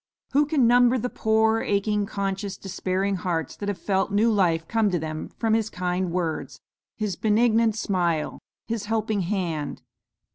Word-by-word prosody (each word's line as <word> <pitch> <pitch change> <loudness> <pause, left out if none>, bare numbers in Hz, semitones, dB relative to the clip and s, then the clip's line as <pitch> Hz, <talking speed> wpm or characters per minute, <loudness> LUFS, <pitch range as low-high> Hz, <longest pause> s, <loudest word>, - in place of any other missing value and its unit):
Who 290 +2 +3
can 290 -5 +3
number 245 +1 +5
the 250 +1 -3
poor, 220 0 +2
aching, 205 0 0
conscious, 195 0 -3
despairing 190 +1 -2
hearts 175 -3 -2
that 205 - -3
have 200 - -2
felt 190 +2 0
new 215 +3 +3
life 170 -6 +2
come 225 -2 +2
to 180 - 0
them 155 -1 -5
from 225 -2 +1
his 220 -1 +1
kind 180 -1 -2
words, 170 -2 -3 0.4
his 210 -4 -2
benignant 220 +2 +3
smile, 175 -7 -1 0.3
his 225 -3 -3
helping 220 -1 0
hand. 170 -6 -3
200 Hz, 155 wpm, -25 LUFS, 180-220 Hz, 0.4 s, number